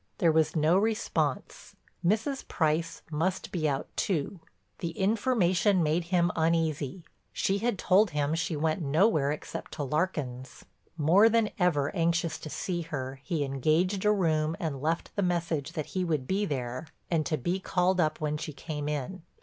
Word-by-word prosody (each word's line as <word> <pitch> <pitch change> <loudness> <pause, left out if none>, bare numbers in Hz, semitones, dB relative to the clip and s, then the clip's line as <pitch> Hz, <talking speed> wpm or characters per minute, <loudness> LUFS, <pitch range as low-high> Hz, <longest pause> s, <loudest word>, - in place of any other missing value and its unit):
There 170 -5 +4
was 160 +1 +2
no 160 +4 +4
response; 220 +1 -2 0.3
Mrs. 220 +9 0
Price 160 +1 0
must 170 +5 -1
be 155 -4 0
out 135 -1 -2
too. 175 0 -1 0.4
The 165 -1 -4
information 200 -3 +2
made 160 +3 +1
him 175 0 +2
uneasy; 160 -1 0 0.3
she 195 +1 0
had 235 -1 0
told 195 +4 +4
him 150 -1 0
she 165 0 -1
went 155 +3 0
nowhere 155 0 +3
except 150 - -6
to 150 - -3
Larkin's. 135 -4 -3 0.3
More 175 +9 +5
than 225 -1 +2
ever 155 -5 +1
anxious 170 0 0
to 155 - -7
see 175 +3 -3
her, 135 -4 -5
he 160 -3 -1
engaged 155 +8 +1
a 210 - +4
room 160 -5 +1
and 145 -6 -3
left 160 +3 -2
the 200 - 0
message 170 -6 -1
that 155 - -3
he 185 - 0
would 155 -7 -1
be 195 +7 0
there 130 -2 -4 0.2
and 165 -2 +2
to 155 - 0
be 175 +8 -1
called 185 0 +1
up 155 -1 0
when 150 -1 -1
she 155 0 -6
came 150 0 -5
in. 150 +5 -4
165 Hz, 165 wpm, -29 LUFS, 150-185 Hz, 0.4 s, More